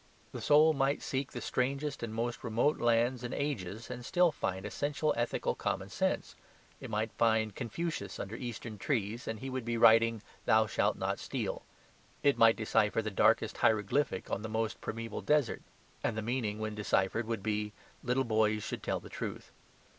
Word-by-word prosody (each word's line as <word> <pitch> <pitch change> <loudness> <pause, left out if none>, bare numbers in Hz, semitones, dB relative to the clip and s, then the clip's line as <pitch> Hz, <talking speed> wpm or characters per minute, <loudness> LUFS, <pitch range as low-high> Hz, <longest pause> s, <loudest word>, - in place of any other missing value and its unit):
The - - -6
soul 155 +2 +6
might 135 0 +1
seek 135 0 -2
the - - -6
strangest 140 +3 -1
and 115 -2 -4
most 115 +2 -3
remote 120 +6 +1
lands 120 +1 +2
and 120 - -3
ages 115 -6 -3
and 125 0 -6
still 175 +5 +3
find 95 -8 -3
essential 145 +7 0
ethical 120 0 0
common - - -2
sense. - - -1 0.4
It - - -8
might 110 +1 -1
find 110 -2 +3
Confucius 125 - -4
under 100 +3 -5
Eastern 115 -3 -6
trees, 115 -1 -1
and 110 -1 -3
he 135 0 -4
would 130 -1 -3
be 115 0 -1
writing 115 -1 +5 0.2
"Thou 110 0 +5
shalt 105 - +1
not - - -1
steal." - - -3 0.6
It 140 -1 +5
might 115 0 +6
decipher 110 0 +1
the 110 - -3
darkest 100 - +3
hieroglyphic 110 +1 +1
on 100 - -1
the 110 - -5
most 110 -1 -2
primeval 115 -1 -4
desert, 150 -5 +2 0.4
and 110 - 0
the 110 - -2
meaning 115 -3 -1
when 110 0 -3
deciphered 105 +1 0
would 115 -4 -3
be 105 0 -1 0.3
"Little 125 +2 +1
boys 110 -2 +2
should - - -4
tell - - -1
the - - -12
truth." - - -6
115 Hz, 175 wpm, -32 LUFS, 110-130 Hz, 0.6 s, soul